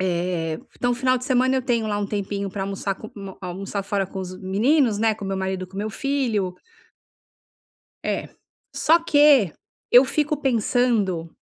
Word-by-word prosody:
Eh, 175 Hz, -3 st, -1 dB, 0.2 s
então 245 Hz, 0 st, +1 dB
o -, -, 0 dB
final 255 Hz, +1 st, +2 dB
de 250 Hz, -, -7 dB
semana 260 Hz, 0 st, +2 dB
eu 260 Hz, -, 0 dB
tenho 235 Hz, -3 st, 0 dB
lá 205 Hz, -1 st, -1 dB
um 205 Hz, -, -1 dB
tempinho 200 Hz, 0 st, -3 dB
pra 195 Hz, +1 st, -4 dB
almoçar 195 Hz, 0 st, -2 dB
com 215 Hz, +3 st, -11 dB
um 195 Hz, -2 st, -8 dB
almoçar 195 Hz, +2 st, -4 dB
fora 195 Hz, 0 st, -1 dB
com 190 Hz, +1 st, -6 dB
os 185 Hz, 0 st, -6 dB
meninos, 220 Hz, +6 st, +2 dB
né? 220 Hz, 0 st, +3 dB
Com 205 Hz, -, -8 dB
meu 195 Hz, 0 st, -2 dB
marido 190 Hz, -1 st, -2 dB
e -, -, -11 dB
com 190 Hz, +1 st, -13 dB
meu 210 Hz, +2 st, -2 dB
filho. 230 Hz, -8 st, -1 dB, 1.5 s
É. -, -, -2 dB, 0.5 s
Só 330 Hz, +2 st, +4 dB
que 290 Hz, -, +5 dB, 0.4 s
eu 245 Hz, +2 st, +8 dB
fico 300 Hz, +2 st, 0 dB
pensando, 225 Hz, -, +1 dB
205 Hz, 180 wpm, -23 LUFS, 190-250 Hz, 1.5 s, eu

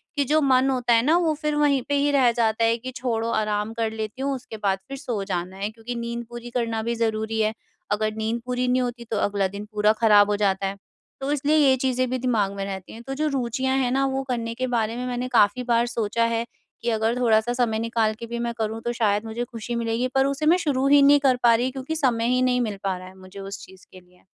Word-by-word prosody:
कि 285 Hz, -, +2 dB
जो 305 Hz, +4 st, +3 dB
मन 265 Hz, -1 st, +3 dB
होता 245 Hz, -2 st, +1 dB
है 230 Hz, -, +5 dB
ना, 320 Hz, +4 st, +4 dB
वो 335 Hz, -3 st, +2 dB
फ़िर 300 Hz, 0 st, -2 dB
वहीं 290 Hz, -3 st, +3 dB
पे 285 Hz, -, +2 dB
ही 285 Hz, +1 st, +2 dB
रह 260 Hz, -4 st, +4 dB
जाता 230 Hz, -1 st, +1 dB
है 230 Hz, 0 st, +3 dB
कि 255 Hz, +2 st, -7 dB
छोड़ो 230 Hz, -2 st, -1 dB
आराम 210 Hz, 0 st, -1 dB
कर 225 Hz, -1 st, -1 dB
लेती 220 Hz, +3 st, -5 dB
हूँ, 275 Hz, 0 st, 0 dB
उसके 240 Hz, -3 st, -9 dB
बाद 195 Hz, -2 st, 0 dB
फ़िर 275 Hz, -, -6 dB
सो 240 Hz, -8 st, -3 dB
जाना 185 Hz, -1 st, -4 dB
है। 200 Hz, +2 st, -2 dB
क्योंकि 225 Hz, +2 st, -7 dB
नींद 235 Hz, 0 st, -4 dB
पूरी 240 Hz, 0 st, -8 dB
करना 230 Hz, -2 st, -1 dB
भी 235 Hz, +1 st, -1 dB
ज़रूरी 220 Hz, -1 st, -1 dB
है, 215 Hz, 0 st, +1 dB, 0.4 s
अगर 215 Hz, +1 st, 0 dB
नींद 220 Hz, +2 st, -2 dB
पूरी 250 Hz, 0 st, -1 dB
नहीं 255 Hz, +1 st, +2 dB
होती 240 Hz, -1 st, -4 dB
तो 220 Hz, -, 0 dB
अगला 200 Hz, -1 st, +1 dB
दिन 200 Hz, +2 st, -7 dB
पूरा 210 Hz, 0 st, +3 dB
ख़राब 210 Hz, -2 st, +6 dB
हो 205 Hz, -, +2 dB
जाता 195 Hz, -1 st, +1 dB
है, 195 Hz, -, -4 dB, 0.5 s
तो 275 Hz, +2 st, -2 dB
इसलिए 295 Hz, +1 st, +1 dB
ये 275 Hz, -3 st, +5 dB
चीज़ें 255 Hz, -1 st, 0 dB
भी 255 Hz, -, -1 dB
दिमाग 225 Hz, -6 st, 0 dB
में 195 Hz, -, -3 dB
रहती 190 Hz, -2 st, -7 dB
हैं। 225 Hz, -, -10 dB
तो 270 Hz, -, -3 dB
जो 305 Hz, +3 st, -1 dB
रुचियाँ 265 Hz, -1 st, -1 dB
हैं 255 Hz, -2 st, +1 dB
ना 270 Hz, +1 st, +2 dB
वो 270 Hz, 0 st, -1 dB
करने 230 Hz, -2 st, -2 dB
के 255 Hz, +1 st, -2 dB
बारे 230 Hz, -2 st, -1 dB
में 250 Hz, -, -3 dB
मैंने 250 Hz, 0 st, -2 dB
काफ़ी 235 Hz, -1 st, +3 dB
बार 235 Hz, -1 st, +2 dB
सोचा 230 Hz, -1 st, -1 dB
है 230 Hz, 0 st, -1 dB, 0.4 s
कि 235 Hz, -, -1 dB
अगर 225 Hz, +1 st, +1 dB
थोड़ा-सा 230 Hz, -1 st, +2 dB
समय 235 Hz, -3 st, 0 dB
निकाल 225 Hz, -1 st, 0 dB
के 235 Hz, -, -6 dB
भी 235 Hz, +1 st, -5 dB
मैं 235 Hz, 0 st, -2 dB
करूँ 220 Hz, 0 st, -2 dB
तो 240 Hz, -, -2 dB
शायद 210 Hz, -2 st, +1 dB
मुझे 225 Hz, +2 st, -3 dB
ख़ुशी 235 Hz, 0 st, -6 dB
मिलेगी। 230 Hz, +1 st, -1 dB
पर 270 Hz, -, +4 dB
उसे 275 Hz, +2 st, -1 dB
मैं 335 Hz, +4 st, +5 dB
शुरू 275 Hz, -6 st, 0 dB
ही 285 Hz, 0 st, +6 dB
नहीं 285 Hz, +1 st, +6 dB
कर 270 Hz, -2 st, +3 dB
पा 235 Hz, -, +6 dB
रही 250 Hz, +3 st, 0 dB
क्योंकि 270 Hz, +4 st, -5 dB
समय 245 Hz, -7 st, +1 dB
ही 255 Hz, -, +2 dB
नहीं 250 Hz, -1 st, +2 dB
मिल 215 Hz, -4 st, -2 dB
पा 190 Hz, -2 st, -1 dB
रहा 185 Hz, 0 st, -10 dB
है 190 Hz, +1 st, -14 dB
मुझे 185 Hz, +1 st, -12 dB
उस 195 Hz, +1 st, -7 dB
चीज़ 190 Hz, 0 st, -17 dB
के 185 Hz, -, -12 dB
लिए। 180 Hz, 0 st, -25 dB
235 Hz, 260 wpm, -24 LUFS, 220-255 Hz, 0.5 s, ख़राब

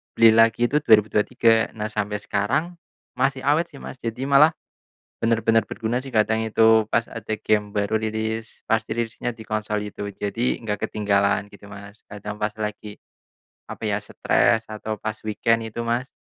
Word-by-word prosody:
beli 115 Hz, -1 st, +7 dB
lagi 115 Hz, +2 st, +4 dB
itu 150 Hz, -, +3 dB
2023. 115 Hz, -1 st, +3 dB
Nah, 105 Hz, -1 st, -4 dB
sampai 105 Hz, +1 st, -2 dB
sekarang 140 Hz, -, -2 dB, 0.4 s
masih 135 Hz, 0 st, +1 dB
awet 155 Hz, +5 st, +2 dB
sih, 150 Hz, -, -17 dB
Mas. 130 Hz, -, -9 dB
Jadi 115 Hz, +3 st, -4 dB
malah, 140 Hz, +3 st, +6 dB, 0.7 s
bener-bener 115 Hz, -1 st, +2 dB
berguna 115 Hz, +2 st, -2 dB
sih. 130 Hz, -1 st, -10 dB
Kadang 110 Hz, +1 st, +2 dB
itu 110 Hz, 0 st, +4 dB
pas 115 Hz, -, +3 dB
ada 110 Hz, -1 st, -6 dB
game 105 Hz, -1 st, 0 dB
baru 105 Hz, +2 st, +1 dB
rilis. 110 Hz, +1 st, -4 dB
Pas 110 Hz, 0 st, +4 dB
dirilisnya 115 Hz, +1 st, -3 dB
di 110 Hz, -, -10 dB
konsol 110 Hz, -1 st, -2 dB
itu. 100 Hz, -, -6 dB
Jadi 115 Hz, +5 st, -1 dB
enggak 105 Hz, -2 st, -2 dB
ketinggalan, 100 Hz, -1 st, +1 dB
gitu 100 Hz, 0 st, -14 dB
Mas. 100 Hz, +1 st, -11 dB
Kadang 105 Hz, 0 st, -7 dB
pas 105 Hz, 0 st, -1 dB
lagi, 105 Hz, -1 st, -5 dB, 0.7 s
apa -, -, -9 dB
ya, 100 Hz, -, +1 dB
stres 110 Hz, +1 st, +2 dB
atau 110 Hz, 0 st, -4 dB
pas 110 Hz, 0 st, -3 dB
weekend, 115 Hz, +2 st, +1 dB
itu 110 Hz, +1 st, -6 dB
Mas. 120 Hz, +2 st, -1 dB
110 Hz, 165 wpm, -23 LUFS, 105-115 Hz, 0.7 s, beli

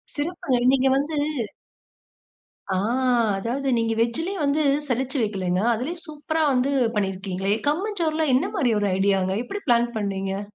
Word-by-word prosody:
சிறப்புங்க. 290 Hz, -4 st, -1 dB, 0.2 s
நீங்க 270 Hz, 0 st, +3 dB
வந்து 290 Hz, +2 st, -2 dB, 1.5 s
ஆ. -, -, +1 dB, 0.6 s
அதாவது 255 Hz, +7 st, -3 dB
நீங்க 225 Hz, 0 st, +1 dB
வெஜ்ஜிலே 320 Hz, +11 st, -1 dB
வந்து 285 Hz, +2 st, +2 dB, 0.3 s
சலிச்சு 265 Hz, +2 st, -1 dB
வைக்கலைங்க. 185 Hz, -4 st, -1 dB
அதிலே 255 Hz, +10 st, -3 dB
சூப்பரா 310 Hz, +1 st, -3 dB
வந்து 255 Hz, +2 st, +1 dB, 0.2 s
பண்ணியிருக்கீங்களே! 195 Hz, 0 st, -1 dB
கம்மஞ்சோறுலாம் 320 Hz, -4 st, 0 dB
என்ன 260 Hz, -, +2 dB
மாரி 250 Hz, -7 st, +2 dB
ஒரு 205 Hz, -, +1 dB
ஐடியாங்க! 195 Hz, -1 st, +2 dB
எப்டி 405 Hz, +11 st, -6 dB
பிளான் 235 Hz, 0 st, +3 dB
பண்ணீங்க? 195 Hz, -1 st, -2 dB
250 Hz, 125 wpm, -24 LUFS, 200-300 Hz, 1.5 s, நீங்க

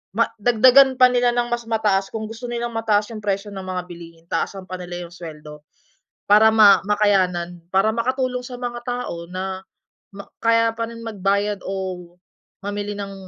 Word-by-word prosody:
ma 230 Hz, -, +2 dB
dagdagan 255 Hz, +4 st, +6 dB
pa 255 Hz, 0 st, +7 dB
nila 245 Hz, -1 st, +2 dB
ng 240 Hz, 0 st, 0 dB
mas 235 Hz, -1 st, -3 dB
mataas 205 Hz, -3 st, +1 dB
kung 220 Hz, -1 st, -4 dB
gusto 230 Hz, +2 st, -7 dB
nilang 240 Hz, 0 st, -3 dB
mataas 215 Hz, -1 st, +1 dB
yung 215 Hz, -, -6 dB
presyo 200 Hz, 0 st, -2 dB
ng 195 Hz, -, -6 dB
mga 185 Hz, -1 st, -3 dB
bilihin 170 Hz, -1 st, -12 dB
taasan 195 Hz, -1 st, -2 dB
pa 185 Hz, -, -5 dB
nila 175 Hz, 0 st, -6 dB
yung -, -, -17 dB
sweldo. 150 Hz, -3 st, -10 dB, 0.7 s
Para 210 Hz, +2 st, +7 dB
ma 215 Hz, -2 st, +7 dB
makayanan. 185 Hz, -4 st, +1 dB
Para 195 Hz, +3 st, +3 dB
makatulong 255 Hz, +1 st, -1 dB
sa 245 Hz, 0 st, -8 dB
mga 240 Hz, -1 st, -4 dB
tao 245 Hz, -9 st, -5 dB
na 190 Hz, 0 st, -4 dB, 0.5 s
ma 200 Hz, -, -9 dB, 0.2 s
kaya 230 Hz, 0 st, +3 dB
pa 230 Hz, 0 st, -3 dB
rin 230 Hz, 0 st, -10 dB
magbayad 200 Hz, -1 st, -1 dB
o 185 Hz, -2 st, -5 dB, 0.5 s
mamili 205 Hz, 0 st, -4 dB
ng 200 Hz, -1 st, -6 dB
205 Hz, 170 wpm, -21 LUFS, 185-230 Hz, 0.7 s, pa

